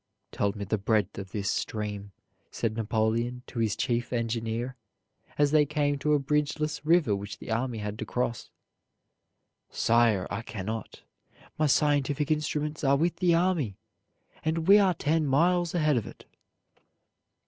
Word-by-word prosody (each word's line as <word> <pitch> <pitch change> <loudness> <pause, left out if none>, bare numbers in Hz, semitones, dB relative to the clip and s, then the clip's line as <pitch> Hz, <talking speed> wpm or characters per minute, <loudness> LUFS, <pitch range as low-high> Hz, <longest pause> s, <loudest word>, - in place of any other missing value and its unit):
"Tell 100 - 0
me 100 -1 -5
the 105 +2 -1
breadth 100 -1 0
of 95 -1 -8
this 100 -2 -1
stream," 105 -2 -4 0.4
said 110 -2 -2
Napoleon 115 +2 -1
to 120 - -7
his 110 -2 +1
chief 120 +1 -1
engineer, 115 +1 -2 0.6
as 145 -1 +3
they 155 -1 +5
came 145 -1 0
to 150 +1 +1
a 145 - +4
bridgeless 150 +1 -1
river 155 - +3
which 100 +1 -6
the - - -8
army 120 +1 -1
had 105 0 -5
to - - -3
cross. 120 -2 -2 1.2
"Sire, 115 -4 +2
I 100 +3 -2
cannot. 110 0 -6 0.6
My 155 - +3
scientific 145 0 +2
instruments 150 0 -1
are 140 0 +4
with 170 +3 0
the 175 -1 +3
army, 165 - +1 0.7
and 160 +1 -1
we 200 +2 +8
are 190 -3 +3
ten 155 0 +1
miles 175 +5 +2
ahead 155 -5 +2
of 115 - -2
it." - - -12
130 Hz, 150 wpm, -28 LUFS, 110-150 Hz, 1.2 s, we